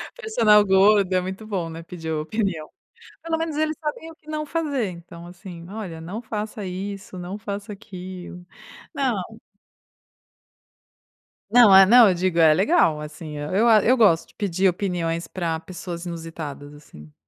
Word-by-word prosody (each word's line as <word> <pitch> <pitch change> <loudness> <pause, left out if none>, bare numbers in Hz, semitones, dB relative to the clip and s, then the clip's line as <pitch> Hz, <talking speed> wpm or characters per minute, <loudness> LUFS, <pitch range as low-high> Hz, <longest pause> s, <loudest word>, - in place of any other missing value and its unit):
Personal 225 - +4
gordo 195 0 +4
é 185 - +2
muito 190 +4 -6
bom, 185 -6 -3
né, 165 +1 -8
pedir 165 -2 -7
opinião. 160 +1 -2 0.5
Pelo 325 -1 -1
menos 320 -2 -3
eles 310 0 0
sabem 320 +1 -5
o - - -16
que 310 - -32
não 305 0 -3
fazer, 285 - -2
então 170 0 -11
assim, 175 -1 -11
olha 190 -7 -7
não 195 +8 -6
faça 215 -2 -5
isso, 190 +1 -6
não 180 +3 -6
faça 205 -1 -6
aquilo, 185 -3 -10 0.5
não 270 -6 0 2.3
Não, 230 -5 +7
é, 195 0 +9
não, 235 +2 +7
eu 185 - +3
digo: 175 -1 -1
"É 160 -2 +6
legal 190 - +2
assim", 150 0 -8
eu 190 +11 0
a 215 -3 +5
eu 255 +3 +4
gosto 195 -8 +3
de - - -24
pedir 190 -1 0
opiniões 170 -3 -2
pra 165 -3 -3
pessoas 175 0 -8
inusitadas 160 -4 -7
assim. 75 - -15
190 Hz, 155 wpm, -23 LUFS, 170-220 Hz, 2.3 s, é